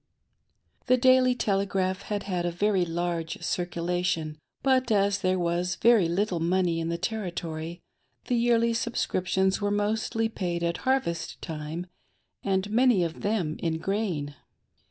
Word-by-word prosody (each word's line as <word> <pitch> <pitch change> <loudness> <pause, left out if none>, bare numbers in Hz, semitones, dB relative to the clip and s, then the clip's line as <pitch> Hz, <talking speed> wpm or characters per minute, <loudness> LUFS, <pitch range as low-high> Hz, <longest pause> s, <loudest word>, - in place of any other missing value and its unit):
The 255 0 +5
Batly 255 0 +4
Telegraph 195 -3 0
had 205 -1 -3
had 180 -3 -2
a 175 - 0
very 190 +1 +1
large 170 -1 -2
circulation, 175 -3 -1 0.2
but 260 -3 +2
as 200 -1 +3
there 185 0 +1
was 175 0 0
very 215 -3 +4
little 185 0 0
money 175 0 +1
in 165 0 -2
the 170 - -1
Territory, 170 -4 -4 0.4
the 250 - -1
yearly 235 -1 +3
subscriptions 190 -4 0
were 205 - +1
mostly 220 +2 0
paid 175 -6 -3
at 170 0 0
harvest 170 -11 -1
time, 160 +2 -5 0.6
and 195 +1 -1
many 235 -4 +4
of 165 -1 -4
them 195 -7 -1
in 165 -1 -1
grain. 175 -6 -2
185 Hz, 135 wpm, -27 LUFS, 170-215 Hz, 0.6 s, The